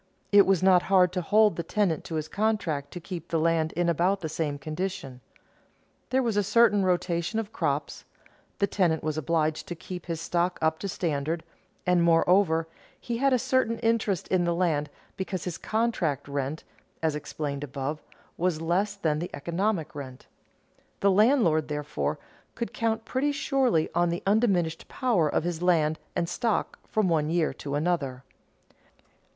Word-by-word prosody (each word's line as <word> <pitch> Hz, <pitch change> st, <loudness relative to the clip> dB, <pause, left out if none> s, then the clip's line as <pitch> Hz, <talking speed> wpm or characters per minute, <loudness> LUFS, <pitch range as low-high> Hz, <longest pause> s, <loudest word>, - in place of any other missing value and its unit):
It 200 Hz, -1 st, +7 dB
was 190 Hz, -2 st, +3 dB
not 185 Hz, -2 st, +6 dB
hard 185 Hz, -2 st, +5 dB
to 180 Hz, -, -1 dB
hold 210 Hz, +1 st, +3 dB
the -, -, 0 dB
tenant 185 Hz, -4 st, 0 dB
to 165 Hz, -, -5 dB
his 155 Hz, -1 st, -2 dB
contract 190 Hz, -9 st, -1 dB
to 175 Hz, -, -7 dB
keep 175 Hz, 0 st, -7 dB
the 165 Hz, -, 0 dB
land 160 Hz, 0 st, +1 dB
in 175 Hz, +1 st, 0 dB
about 175 Hz, +4 st, +1 dB
the 160 Hz, -, -3 dB
same 150 Hz, -2 st, -2 dB
condition. 155 Hz, -3 st, -5 dB, 0.9 s
There 260 Hz, +1 st, +2 dB
was 230 Hz, -3 st, 0 dB
a 205 Hz, -, +3 dB
certain 210 Hz, -1 st, +4 dB
rotation 175 Hz, +1 st, 0 dB
of 220 Hz, -2 st, -3 dB
crops; -, -, -2 dB, 0.5 s
the 200 Hz, -, +3 dB
tenant 175 Hz, -5 st, +1 dB
was 155 Hz, -1 st, -1 dB
obliged 155 Hz, 0 st, 0 dB
to 175 Hz, -, -5 dB
keep 180 Hz, +2 st, -8 dB
his 165 Hz, -2 st, -3 dB
stock 175 Hz, +1 st, 0 dB
up 160 Hz, 0 st, +1 dB
to 200 Hz, -, -3 dB
standard; 160 Hz, -2 st, -2 dB, 0.4 s
and, 180 Hz, -1 st, +3 dB
moreover, 165 Hz, 0 st, +3 dB, 0.3 s
he 235 Hz, -1 st, -3 dB
had 275 Hz, +2 st, +2 dB
a 255 Hz, -, +4 dB
certain 255 Hz, -2 st, +1 dB
interest 225 Hz, -6 st, +1 dB
in 185 Hz, -2 st, +2 dB
the 170 Hz, 0 st, +1 dB
land 155 Hz, -5 st, 0 dB, 0.3 s
because 190 Hz, -2 st, -3 dB
his 175 Hz, -2 st, -4 dB
contract 215 Hz, -, -1 dB
rent 140 Hz, +2 st, -3 dB, 0.4 s
(as 160 Hz, -1 st, +2 dB
explained 145 Hz, -1 st, -4 dB
above) 140 Hz, +2 st, -4 dB, 0.4 s
was 175 Hz, -2 st, 0 dB
less 185 Hz, +5 st, 0 dB
than 155 Hz, -6 st, 0 dB
the 175 Hz, -, -4 dB
economic 170 Hz, +2 st, -1 dB
rent. 130 Hz, -3 st, -8 dB, 0.8 s
The 200 Hz, -, +4 dB
landlord, 195 Hz, -, +4 dB
therefore, 150 Hz, 0 st, -2 dB, 0.4 s
could 235 Hz, -, -4 dB
count 225 Hz, -1 st, -1 dB
pretty 280 Hz, +5 st, 0 dB
surely 265 Hz, -, +1 dB
on 175 Hz, 0 st, +2 dB
the 170 Hz, +1 st, -3 dB
undiminished 195 Hz, -6 st, +1 dB
power 220 Hz, -, +1 dB
of -, -, 0 dB
his 175 Hz, -1 st, -3 dB
land 160 Hz, -3 st, +2 dB, 0.2 s
and 170 Hz, -, 0 dB
stock 220 Hz, +5 st, -1 dB
from 215 Hz, -3 st, +1 dB
one 155 Hz, -3 st, +1 dB
year 165 Hz, -1 st, +1 dB
to 140 Hz, 0 st, -5 dB
another. 145 Hz, -5 st, -1 dB
175 Hz, 170 wpm, -27 LUFS, 155-200 Hz, 0.9 s, It